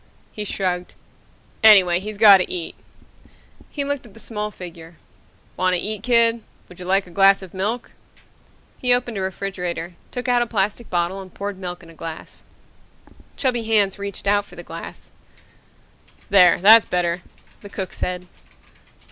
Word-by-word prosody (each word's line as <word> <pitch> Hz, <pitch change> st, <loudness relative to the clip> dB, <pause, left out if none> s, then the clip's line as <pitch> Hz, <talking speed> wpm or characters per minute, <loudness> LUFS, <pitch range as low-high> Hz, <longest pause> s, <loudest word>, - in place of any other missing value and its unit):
_ -, -, -36 dB, 0.3 s
He 210 Hz, -, -5 dB
shrugged. 180 Hz, -3 st, -3 dB, 0.7 s
"Anyway, 190 Hz, -5 st, +7 dB
he's 210 Hz, +2 st, -7 dB
got 205 Hz, -2 st, +9 dB
to 180 Hz, -, -3 dB
eat." 175 Hz, -2 st, -4 dB, 1.0 s
He 285 Hz, -, -3 dB
looked 285 Hz, -1 st, -3 dB
at 230 Hz, -3 st, -17 dB
the -, -, -13 dB
small 210 Hz, -1 st, -4 dB
figure. 170 Hz, -4 st, -11 dB, 0.6 s
"Want 185 Hz, 0 st, +2 dB
to -, -, 0 dB
eat, 215 Hz, +1 st, -3 dB
kid? 235 Hz, 0 st, +3 dB, 0.3 s
Would 180 Hz, -, -15 dB
you 180 Hz, -, -8 dB
like 195 Hz, +1 st, +2 dB
a 180 Hz, -, -15 dB
glass 195 Hz, +1 st, +4 dB
of 185 Hz, -, -12 dB
milk?" 210 Hz, +6 st, -3 dB, 0.9 s
He 250 Hz, -1 st, +4 dB
opened 240 Hz, -4 st, -3 dB
a -, -, -3 dB
refrigerator, 180 Hz, -3 st, -4 dB, 0.2 s
took 250 Hz, 0 st, -6 dB
out 245 Hz, -1 st, +3 dB
a 240 Hz, -, 0 dB
plastic 210 Hz, +2 st, -1 dB
bottle 175 Hz, +2 st, -1 dB
and 185 Hz, -1 st, -12 dB
poured 200 Hz, 0 st, -6 dB
milk 180 Hz, -1 st, -6 dB
in 165 Hz, -, -15 dB
a -, -, -16 dB
glass. 165 Hz, 0 st, -8 dB, 1.0 s
Chubby 245 Hz, -4 st, 0 dB
hands 210 Hz, -3 st, +2 dB
reached 200 Hz, 0 st, -6 dB
out 205 Hz, +1 st, +3 dB
for -, -, -15 dB
the -, -, -9 dB
glass. -, -, -9 dB, 1.2 s
"There, 180 Hz, -3 st, +6 dB
that's 215 Hz, +4 st, +7 dB
better," 175 Hz, 0 st, -1 dB, 0.4 s
the 205 Hz, -, -12 dB
cook 190 Hz, -2 st, -5 dB
said. 180 Hz, 0 st, -4 dB
195 Hz, 165 wpm, -21 LUFS, 180-220 Hz, 1.2 s, got